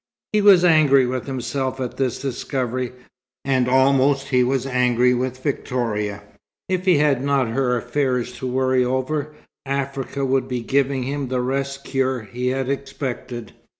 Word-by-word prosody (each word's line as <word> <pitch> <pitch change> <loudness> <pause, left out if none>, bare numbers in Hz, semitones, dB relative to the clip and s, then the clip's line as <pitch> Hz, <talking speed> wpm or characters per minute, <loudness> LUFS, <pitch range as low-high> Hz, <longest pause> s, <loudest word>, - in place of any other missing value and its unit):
He 210 - +3
was 195 -3 +7
angry 150 -6 +5
with 125 +1 -3
himself 130 0 -3
at 125 -2 -4
this 130 -3 0
discovery, 130 -2 -3 0.5
and 130 -2 +2
almost 135 +1 +3
he 125 -2 +3
was 130 +1 0
angry 125 -1 +2
with 130 +1 -3
Victoria. 105 -7 -2 0.4
If 185 0 -1
he 180 -5 +5
had 145 -3 +2
not 140 -4 +1
her 125 +1 +1
affairs 125 0 -1
to 130 - -3
worry 130 0 +2
over, 140 +4 -2 0.3
Africa 140 0 -3
would 130 0 +1
be 125 -2 -3
giving 135 +2 0
him 140 +1 -3
the 125 0 -1
rest 135 +2 -2
cure 130 -2 -1
he 125 +4 -4
had 130 0 -1
expected. 130 -4 -5
130 Hz, 150 wpm, -22 LUFS, 125-140 Hz, 0.5 s, was